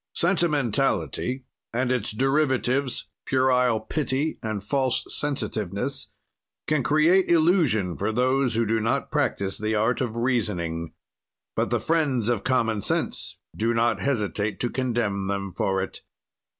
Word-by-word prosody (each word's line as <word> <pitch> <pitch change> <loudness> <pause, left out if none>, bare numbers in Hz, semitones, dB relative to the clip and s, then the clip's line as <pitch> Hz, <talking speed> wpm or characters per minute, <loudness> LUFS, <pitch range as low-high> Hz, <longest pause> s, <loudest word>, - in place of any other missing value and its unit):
"Sentimentality 135 - +1 0.3
and 125 +2 0
its 120 -4 0
derivatives, 135 +1 +1 0.2
puerile 125 -3 +3
pity 145 +5 -2
and 110 -3 -3
false 130 +3 0
sensitiveness, 125 - -2 0.6
can 155 -2 +1
create 165 +7 +3
illusion 155 - +3
for 100 +3 -1
those 130 +1 +2
who 115 0 +2
do 115 +1 +1
not 115 +1 -1
practise 95 -1 0
the 110 +1 0
art 110 +5 +1
of 115 -3 -2
reasoning, 90 -10 -1 0.6
but - - 0
the - - +1
friends 140 -9 +1
of 120 -4 0
common 115 -5 +1
sense - - -1 0.2
do 115 +2 +1
not 115 +1 +2
hesitate 105 -5 -1
to 120 - 0
condemn 115 -7 -1
them 100 -1 -3
for 95 +1 0
it. - - -8
120 Hz, 130 wpm, -25 LUFS, 105-135 Hz, 0.6 s, puerile